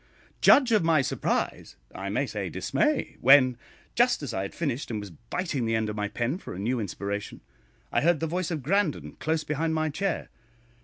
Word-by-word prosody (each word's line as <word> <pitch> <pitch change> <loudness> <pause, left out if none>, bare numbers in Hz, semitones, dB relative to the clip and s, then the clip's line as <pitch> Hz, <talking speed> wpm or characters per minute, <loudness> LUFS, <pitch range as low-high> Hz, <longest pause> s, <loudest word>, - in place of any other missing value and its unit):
Judge 260 -4 +6
of 215 -5 +4
my 160 -3 +3
surprise - - -2 0.2
I - - -5
may - - 0
say - - -4
dismay - - 0
when, 130 -1 +7 0.4
just 240 -7 +3
as 125 -5 -4
I 95 - -1
had 100 - -6
finished, 140 -5 -2
and 110 -3 -2
was 100 -3 -8
biting 135 - -3
the 115 - +1
end 110 -1 0
of 105 - -4
my 105 -1 -1
pen 120 - -2
for - - -8
a - - -7
new 120 +5 0
inspiration, 100 0 -4 0.5
I - - +2
heard 170 0 +3
the 165 - -1
voice 175 +2 -2
of 155 -6 -3
Grandon 180 +1 0
close 160 0 0
behind 160 +2 -1
my 155 0 0
chair. 190 +5 -2
145 Hz, 200 wpm, -27 LUFS, 115-165 Hz, 0.5 s, when